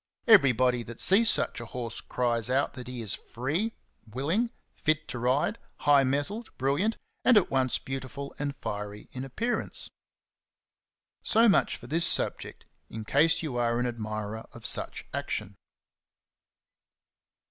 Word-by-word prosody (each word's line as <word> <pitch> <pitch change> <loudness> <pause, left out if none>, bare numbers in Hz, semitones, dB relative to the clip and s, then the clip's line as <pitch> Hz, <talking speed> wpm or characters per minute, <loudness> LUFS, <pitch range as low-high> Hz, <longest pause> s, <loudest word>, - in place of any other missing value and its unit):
Everybody 130 - +5
that 115 0 -9
sees 210 +4 +5
such - - 0
a - - -6
horse 120 -2 -4
cries 120 -2 -1
out 135 +2 +1
that 125 -2 -8
he 125 -2 -5
is 105 - +1
free, 155 - -2 0.3
willing, 160 - 0 0.2
fit 155 0 0
to 120 - -4
ride, 135 - +1 0.2
high 145 -1 +5
mettled, 145 - -2
brilliant, 145 - +1 0.3
and 250 - +6
at 200 - +3
once 130 -2 +2
beautiful 135 +1 -6
and 145 -1 -2
fiery 105 -5 -6
in 130 - -6
appearance. 225 - -2 1.3
So 230 +1 +4
much 200 - +3
for - - -13
this 165 +7 +3
subject, - - -2 0.2
in 110 -1 -7
case 155 +7 +3
you 140 -6 -3
are 120 -1 +1
an 125 - 0
admirer 110 -2 -4
of - - -11
such - - +2
action. - - -3
135 Hz, 140 wpm, -28 LUFS, 120-160 Hz, 1.3 s, and